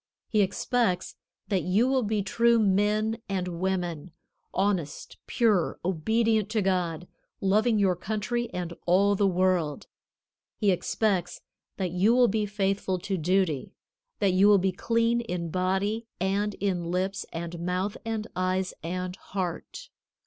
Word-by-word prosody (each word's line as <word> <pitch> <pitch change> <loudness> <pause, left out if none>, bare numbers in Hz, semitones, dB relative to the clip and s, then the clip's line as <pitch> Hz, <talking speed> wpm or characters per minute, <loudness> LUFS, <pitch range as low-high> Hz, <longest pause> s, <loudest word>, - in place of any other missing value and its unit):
He 215 - +3
expects 195 -1 0 0.3
that 195 -3 +1
you 200 +7 +2
will 265 0 +2
be 210 -2 0
true 235 +4 +3
men 215 +2 +1
and 185 -2 -1
women, 180 -3 -2 0.4
honest, 185 -6 -2
pure, 215 -7 +2
obedient 220 +4 +1
to 215 -1 0
God, 180 -3 -1 0.3
loving 215 +4 +2
your 195 -3 +3
country 220 +6 -2
and 175 -1 -4
all 195 +3 +4
the 200 0 +2
world. 180 -5 +1 0.7
He 205 -3 +3
expects 185 0 -1 0.4
that 185 -3 -2
you 195 +7 +3
will 250 -1 +5
be 210 0 0
faithful 195 -2 -1
to 190 +2 -3
duty, 175 -4 0 0.4
that 195 -3 +2
you 190 +2 +5
will 205 -1 +7
be 190 0 +1
clean 230 +4 +1
in 175 -7 -4
body 195 +5 0
and 200 +2 0
in 185 -3 -1
lips 190 +2 -1
and 170 0 -5
mouth 180 +4 -2
and 225 -1 -3
eyes 185 0 0
and 180 +2 -4
heart. 190 - -5
195 Hz, 140 wpm, -27 LUFS, 180-215 Hz, 0.7 s, will